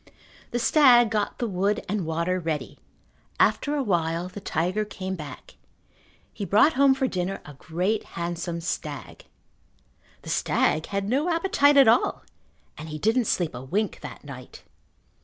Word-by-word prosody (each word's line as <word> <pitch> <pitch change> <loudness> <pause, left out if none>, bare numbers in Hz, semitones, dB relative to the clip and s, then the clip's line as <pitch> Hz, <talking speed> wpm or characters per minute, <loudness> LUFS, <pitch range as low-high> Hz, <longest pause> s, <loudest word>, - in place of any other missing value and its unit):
The - - -2
stag 240 -3 +5
got 210 -2 -1
the 240 - -2
wood 200 +1 -1
and 195 -4 -2
water 170 +3 -1
ready. 160 -3 -4 0.6
After 295 0 +2
a 285 - 0
while 170 -3 -1
the 205 - -9
tiger 185 +3 -1
came 190 -2 -5
back. 150 -7 -9 0.8
He - - -6
brought 215 +11 +4
home 275 -1 +4
for 265 0 0
dinner 185 -4 -2
a 145 - -10
great 180 +9 -2
handsome 170 0 -3
stag. 150 -4 -5 1.0
The - - -8
stag 155 - +1
had 200 0 -2
no 280 +9 +1
appetite 330 -4 +3
at 275 - +7
all 230 +3 +3 0.6
and 155 +1 -7
he 155 - -5
didn't 225 +8 +1
sleep 175 -5 0
a 120 - -7
wink 195 +10 -2
that - - -9
night. 130 -3 -11
195 Hz, 155 wpm, -25 LUFS, 165-235 Hz, 1.0 s, at